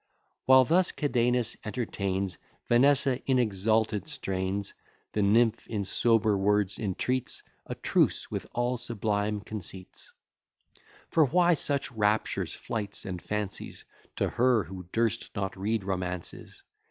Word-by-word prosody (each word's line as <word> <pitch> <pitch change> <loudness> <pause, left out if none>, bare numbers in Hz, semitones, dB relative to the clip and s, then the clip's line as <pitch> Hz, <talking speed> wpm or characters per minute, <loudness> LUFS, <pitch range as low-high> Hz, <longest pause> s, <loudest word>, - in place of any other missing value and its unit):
While 130 0 +7
thus 180 +6 +3
Cadenus 125 -4 0
entertains 100 - -3 0.3
Vanessa 130 +1 +4
in 130 -1 +3
exalted 110 +2 +1
strains, 95 -7 -3 0.4
The 105 - +1
nymph 110 +3 +3
in 105 -3 -2
sober 110 +1 +3
words 100 0 +1
entreats 120 +5 -2 0.2
A - - -4
truce - - +1
with - - -4
all 120 +1 0
sublime 105 -3 -1
conceits; 95 -3 -8 1.0
For 160 - +5
why 175 +5 +4
such 140 -4 +2
raptures, 105 -1 0
flights, 105 -3 -4
and 90 -2 -5
fancies, 105 -2 -4 0.3
To - - 0
her 120 -3 +2
who 90 0 -9
durst 115 -1 0
not 95 -2 -2
read 105 +2 -1
romances? 90 -2 -5
110 Hz, 120 wpm, -28 LUFS, 100-125 Hz, 1.0 s, While